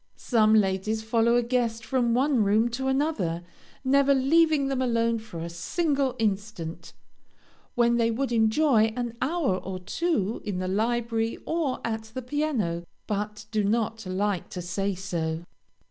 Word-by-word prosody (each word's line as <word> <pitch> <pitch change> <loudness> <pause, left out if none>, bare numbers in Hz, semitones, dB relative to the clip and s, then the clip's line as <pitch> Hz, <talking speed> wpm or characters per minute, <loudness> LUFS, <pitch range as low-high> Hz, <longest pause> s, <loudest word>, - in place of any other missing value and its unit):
Some 220 -3 +3
ladies 210 +2 +1
follow 230 +1 +2
a 240 - +3
guest 230 -2 -1
from 240 -2 +1
one 260 -2 +3
room 215 +4 +3
to 265 +3 -3
another, 265 - 0 0.4
never 275 +1 +4
leaving 300 +1 +3
them 270 -1 -1
alone 230 -2 +1
for 215 -6 -9
a 170 - -4
single 275 - -1
instant, 200 -6 -3 0.8
when 235 -1 +3
they 230 -1 +2
would 250 +3 -1
enjoy 225 0 +3
an 240 -2 -3
hour 285 - +1
or 190 0 -5
two 225 - -1
in 205 -4 -3
the 185 0 -2
library 225 +2 0
or 315 -6 -1
at 220 -1 -3
the 255 - -4
piano, 245 - -1 0.2
but 210 0 -3
do 215 -2 +1
not 225 0 -1
like 190 0 -1
to 180 - -5
say 195 +3 -2
so. 170 -3 -3
225 Hz, 150 wpm, -26 LUFS, 200-260 Hz, 0.8 s, never